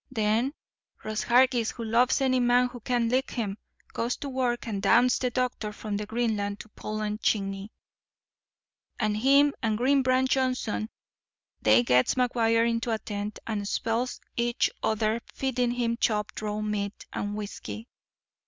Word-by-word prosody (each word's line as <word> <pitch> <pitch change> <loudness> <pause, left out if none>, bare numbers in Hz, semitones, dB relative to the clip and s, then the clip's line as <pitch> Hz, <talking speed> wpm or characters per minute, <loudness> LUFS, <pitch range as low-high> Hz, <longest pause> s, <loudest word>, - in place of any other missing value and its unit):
Then 230 +3 0 0.5
Ross 215 0 -2
Hargis, 245 -2 +3
who 235 - -6
loves 235 +4 +2
any 260 -1 +3
man 245 0 +3
who 245 - -9
can 240 0 0
lick 255 +3 +1
him, 210 -4 -3 0.3
goes 235 +2 -1
to 280 - -5
work 250 -2 -1
and 200 -3 -3
damns 240 +5 +4
the 250 - 0
doctors 245 -4 -2
from 215 -2 -4
Greenland 210 -2 -1
to 220 - -14
Poland 215 +1 -4
Chiny; 195 0 -1 1.3
and 215 -2 +1
him 280 +5 +5
and 220 -3 0
Green 270 +4 +3
Branch 260 0 +2
Johnson 255 - 0 0.7
they 110 +2 +5
gets 125 +1 +3
McGuire 230 -2 +2
into 230 +1 -1
a 225 - +1
tent, 205 -1 -5
and 205 -3 -3
spells 230 +4 -1 0.2
each 235 0 +1
other 220 +1 0
feedin' 250 -2 0
him 240 -1 -1
chopped 210 -3 -1
raw 210 0 -2
meat 210 -1 -3
and 205 0 -3
whisky. 215 +2 -6
230 Hz, 150 wpm, -27 LUFS, 210-250 Hz, 1.3 s, him